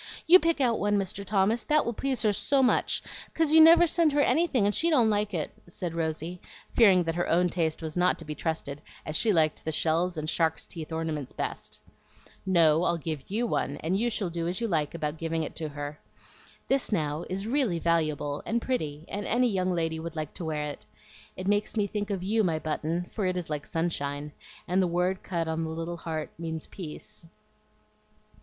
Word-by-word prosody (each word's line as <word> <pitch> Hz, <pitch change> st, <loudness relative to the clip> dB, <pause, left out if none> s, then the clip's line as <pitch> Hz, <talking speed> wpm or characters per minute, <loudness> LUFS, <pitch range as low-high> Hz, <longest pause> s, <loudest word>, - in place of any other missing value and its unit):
"You 360 Hz, +3 st, +9 dB
pick 335 Hz, -3 st, +1 dB
out 240 Hz, -4 st, +2 dB
one, 205 Hz, 0 st, +2 dB
Mr. 195 Hz, 0 st, -3 dB
Thomas, 205 Hz, +3 st, +1 dB
that 305 Hz, -1 st, +3 dB
will 235 Hz, -, -1 dB
please 260 Hz, 0 st, -1 dB
her 210 Hz, -2 st, +3 dB
so 270 Hz, +6 st, +2 dB
much, 250 Hz, -, +2 dB, 0.3 s
'cause 320 Hz, -2 st, +2 dB
you 320 Hz, -, +9 dB
never 335 Hz, +2 st, +8 dB
send 330 Hz, -1 st, +3 dB
her 295 Hz, -, +2 dB
anything, 275 Hz, -5 st, +2 dB
and 205 Hz, -, +2 dB
she 335 Hz, -, +3 dB
don't 245 Hz, -9 st, +4 dB
like 210 Hz, 0 st, 0 dB
it," 165 Hz, -6 st, -2 dB, 0.2 s
said 175 Hz, -1 st, -4 dB
Rosy, 165 Hz, +2 st, -3 dB, 0.3 s
fearing 195 Hz, -6 st, +6 dB
that 165 Hz, -1 st, -1 dB
her 175 Hz, +1 st, -1 dB
own 175 Hz, +2 st, +3 dB
taste 165 Hz, -2 st, -1 dB
was 155 Hz, -1 st, -4 dB
not 180 Hz, +1 st, +3 dB
to 165 Hz, -, -8 dB
be 150 Hz, -, -4 dB
trusted, 150 Hz, -3 st, -4 dB, 0.2 s
as 155 Hz, -, -3 dB
she 220 Hz, +6 st, +3 dB
liked 160 Hz, -4 st, +2 dB
the 160 Hz, -, -2 dB
shells 165 Hz, +3 st, +1 dB
and 155 Hz, 0 st, -3 dB
shark's 160 Hz, 0 st, 0 dB
teeth 165 Hz, -2 st, -8 dB
ornaments 160 Hz, -4 st, -3 dB
best. -, -, -5 dB, 0.7 s
"No, 165 Hz, -3 st, +5 dB
I'll 170 Hz, -, +1 dB
give 155 Hz, -3 st, -5 dB
YOU 225 Hz, +5 st, 0 dB
one, 145 Hz, -, -1 dB
and 165 Hz, +4 st, 0 dB
you 235 Hz, +5 st, +1 dB
shall 200 Hz, -6 st, -3 dB
do 165 Hz, 0 st, -2 dB
as 180 Hz, +1 st, -2 dB
you 235 Hz, -, -1 dB
like 155 Hz, -5 st, 0 dB
about 155 Hz, -1 st, -3 dB
giving 165 Hz, 0 st, -1 dB
it -, -, -6 dB
to 155 Hz, -2 st, -3 dB
her. 145 Hz, 0 st, -6 dB, 0.7 s
This, 270 Hz, -3 st, +1 dB
now, 155 Hz, -4 st, -1 dB
is 190 Hz, +2 st, -3 dB
really 235 Hz, -7 st, +1 dB
valuable 155 Hz, -4 st, 0 dB
and 235 Hz, -, 0 dB
pretty, 155 Hz, -, -3 dB
and 205 Hz, 0 st, -4 dB
any 245 Hz, +1 st, +2 dB
young 185 Hz, -1 st, 0 dB
lady 165 Hz, -2 st, -1 dB
would 165 Hz, 0 st, -6 dB
like 155 Hz, -2 st, -4 dB
to 175 Hz, -, -6 dB
wear 155 Hz, -2 st, -2 dB
it. -, -, -12 dB, 0.5 s
It 185 Hz, -, -5 dB
makes 205 Hz, +2 st, +1 dB
me 205 Hz, -, +3 dB
think 205 Hz, +1 st, -3 dB
of 195 Hz, -3 st, -2 dB
you, 215 Hz, +3 st, +2 dB
my 165 Hz, -4 st, +1 dB
Button, 160 Hz, +2 st, -2 dB
for 200 Hz, -4 st, -1 dB
it 185 Hz, 0 st, -1 dB
is 170 Hz, -3 st, -4 dB
like 150 Hz, -1 st, -3 dB
sunshine, 150 Hz, -3 st, -2 dB, 0.4 s
and 185 Hz, +2 st, +2 dB
the 185 Hz, -, +2 dB
word 180 Hz, +2 st, 0 dB
cut 170 Hz, -3 st, -2 dB
on 160 Hz, 0 st, -1 dB
the 160 Hz, -, -3 dB
little 165 Hz, +2 st, -4 dB
heart 160 Hz, -2 st, -4 dB
means 160 Hz, -1 st, -4 dB
peace." 170 Hz, -2 st, -9 dB
175 Hz, 215 wpm, -28 LUFS, 160-210 Hz, 0.7 s, You